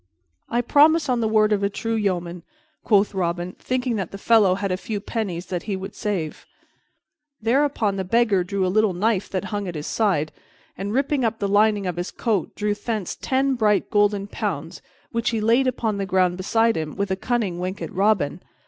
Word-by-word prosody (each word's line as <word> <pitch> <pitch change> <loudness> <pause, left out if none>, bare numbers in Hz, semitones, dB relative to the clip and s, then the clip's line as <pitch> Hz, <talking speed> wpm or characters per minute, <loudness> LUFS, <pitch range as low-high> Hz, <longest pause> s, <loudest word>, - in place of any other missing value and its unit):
"I 240 - +1
promise 300 +5 +4
on 245 -1 +2
the 225 - +1
word 215 -1 +3
of 200 - 0
a 200 - +1
true 225 +3 -3
yeoman," 180 -5 -1 0.4
quoth 205 -1 +3
Robin, 175 -1 -2
thinking 250 -2 -1
that 190 -4 -3
the 195 - -8
fellow 205 -3 +4
had 200 0 -2
a - - +1
few 205 +2 -4
pennies 195 -5 -4
that 180 -2 -3
he 200 - 0
would 190 +2 -6
save. 180 -7 -4 0.9
Thereupon 230 -3 +1
the 190 - -1
Beggar 210 -1 +2
drew 190 +1 -1
a - - +1
little 205 0 +2
knife 205 +1 0
that 190 0 -2
hung 205 -1 -2
at 175 - -5
his 150 0 -5
side 180 -9 0 0.4
and, 200 +1 -4
ripping 275 +2 +1
up 225 -1 0
the 200 - -1
lining 205 0 +3
of 180 -2 -3
his 175 +1 -3
coat, 215 -8 -2
drew 210 0 0
thence 210 -2 -3
ten 270 +1 0
bright 215 -4 +1
golden 205 -1 +2
pounds, 205 - -4 0.3
which 230 -1 0
he 225 - -1
laid 230 +5 +3
upon 225 -4 -1
the 195 -1 -2
ground 185 -1 +2
beside 225 +5 +2
him 155 -1 -4
with 200 -1 -2
a - - +2
cunning 205 -4 -1
wink 185 +2 -3
at - - -6
Robin. 190 -5 +1
205 Hz, 200 wpm, -23 LUFS, 185-225 Hz, 0.9 s, promise